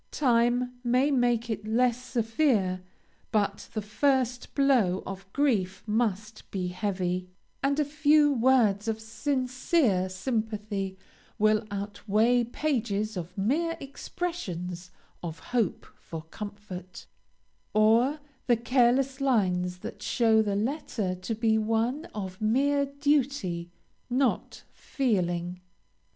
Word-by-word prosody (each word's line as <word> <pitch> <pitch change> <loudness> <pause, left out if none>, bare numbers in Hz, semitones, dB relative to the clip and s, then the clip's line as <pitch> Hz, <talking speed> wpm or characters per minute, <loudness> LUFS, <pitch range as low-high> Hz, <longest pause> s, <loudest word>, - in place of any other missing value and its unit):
Time 245 -1 +1
may 255 +4 +3
make 240 -3 +2
it 215 -2 -4
less 245 +2 +2
severe, 225 -6 +1 0.5
but 205 -2 0
the 215 - -1
first 250 +2 0
blow 250 -10 +3
of 195 0 -8
grief 200 -10 0
must 215 -1 -2
be 185 -2 -2
heavy, 185 -1 -2 0.3
and 280 +2 +1
a 300 - +3
few 295 0 +4
words 230 -5 +3
of 220 0 -1
sincere 250 - 0
sympathy 210 -2 -3 0.4
will 215 +1 +3
outweigh 210 +4 +1
pages 230 -5 -1
of 180 +1 -6
mere 320 +12 0
expressions 185 - -5 0.3
of 165 -1 -5
hope 235 -7 -1
for 160 -1 -7
comfort, 200 -3 -8 0.7
or 230 +7 +3 0.3
the 240 -2 +4
careless 255 +3 +2
lines 180 -9 +1
that - - -8
show 225 -2 +3
the 205 -2 0
letter 220 -4 -1
to 185 +5 -4
be 220 0 +2
one 225 +8 0
of 190 - -7
mere 280 +6 +2
duty, 275 - 0 0.4
not 255 0 0
feeling. 180 -8 -1
225 Hz, 110 wpm, -28 LUFS, 195-260 Hz, 0.7 s, few